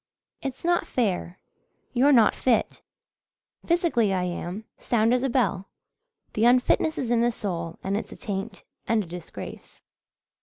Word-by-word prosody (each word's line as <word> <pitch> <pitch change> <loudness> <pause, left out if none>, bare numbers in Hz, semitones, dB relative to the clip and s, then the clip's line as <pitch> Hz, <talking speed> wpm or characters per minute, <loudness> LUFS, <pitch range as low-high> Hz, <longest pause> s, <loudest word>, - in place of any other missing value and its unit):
"It's 270 +2 -5
not 350 0 +2
fair 190 -6 -1 0.6
you're 265 +4 +4
not 230 -6 +6
fit." 245 -3 0 0.9
"Physically 330 - +2
I 185 -1 0
am. 180 +4 -4
Sound 230 0 +2
as 250 - +2
a 270 - 0
bell. 200 -7 0 0.7
The 215 - 0
unfitness 250 +5 +3
is 240 -2 -2
in 235 -1 +3
the 240 - +3
soul 170 -7 -4
and 195 +1 -1
it's 210 - -4
a - - -9
taint 195 0 -5 0.2
and 225 -2 +2
a - - -10
disgrace. 175 0 -9
225 Hz, 150 wpm, -26 LUFS, 195-250 Hz, 0.9 s, not